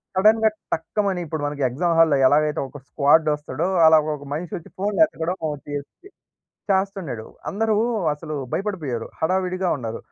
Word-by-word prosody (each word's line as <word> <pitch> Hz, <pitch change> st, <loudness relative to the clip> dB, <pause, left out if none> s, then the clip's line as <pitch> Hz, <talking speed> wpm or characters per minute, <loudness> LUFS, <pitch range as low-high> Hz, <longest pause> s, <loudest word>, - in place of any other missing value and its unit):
సడెన్‌గా 220 Hz, +3 st, +5 dB, 0.2 s
టక్కమని 190 Hz, +3 st, -1 dB
ఇప్పుడు 155 Hz, -1 st, -4 dB
మనకి 145 Hz, 0 st, -5 dB
ఎగ్జామ్ 165 Hz, +7 st, 0 dB
హాల్‌లో 160 Hz, -4 st, +5 dB
ఎలాగైతే 150 Hz, +2 st, +2 dB
ఒక 145 Hz, -, -10 dB
స్క్వాడ్ 155 Hz, +2 st, +4 dB
వస్తాడో, 150 Hz, +2 st, -3 dB, 0.2 s
అలాగ 160 Hz, -1 st, +6 dB
ఒక 145 Hz, -, -12 dB
మనిషొచ్చి 165 Hz, +1 st, -5 dB
ఫోన్‌లెతకడం 195 Hz, -, +1 dB, 0.3 s
జేస్సీ 145 Hz, -, -7 dB, 0.6 s
చేస్తున్నడు. 190 Hz, -, -1 dB, 0.2 s
అందరూ 220 Hz, +2 st, 0 dB, 0.4 s
అసలు 155 Hz, +1 st, -6 dB, 0.2 s
భయపడిపోయారు 160 Hz, -, -3 dB
హడావిడిగా 185 Hz, +2 st, 0 dB
ఉన్నారు. 115 Hz, -4 st, -5 dB
160 Hz, 125 wpm, -23 LUFS, 145-190 Hz, 0.6 s, అలాగ